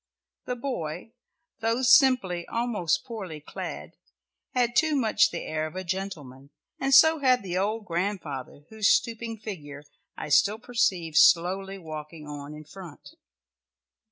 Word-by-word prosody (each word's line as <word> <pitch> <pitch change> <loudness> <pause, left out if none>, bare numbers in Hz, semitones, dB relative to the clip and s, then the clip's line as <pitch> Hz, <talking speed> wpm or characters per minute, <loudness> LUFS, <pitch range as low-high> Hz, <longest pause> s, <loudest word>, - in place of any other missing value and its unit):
The 250 - -3
boy, 225 - -5 0.5
though 230 +3 0
simply, 235 - +4
almost 230 -8 -1
poorly 190 -9 -7
clad, 150 - -8 0.6
had 240 -1 +1
too 315 -2 +3
much 230 -6 +3
the 170 - -5
air 155 0 -2
of 155 - -12
a 185 - -4
gentleman, 165 -8 -6 0.3
and 270 0 -1
so 315 +4 +7
had 255 -4 +3
the 185 -1 -2
old 210 +2 -2
grandfather, 165 -7 -4
whose 220 -2 +1
stooping 230 -1 0
figure 150 -10 -8 0.3
I - - -6
still 205 +8 +4
perceived 220 -10 0
slowly 190 +4 +4
walking 155 -2 -8
on 145 0 -8
in 155 - -10
front. 170 0 -12
190 Hz, 135 wpm, -26 LUFS, 155-230 Hz, 0.6 s, so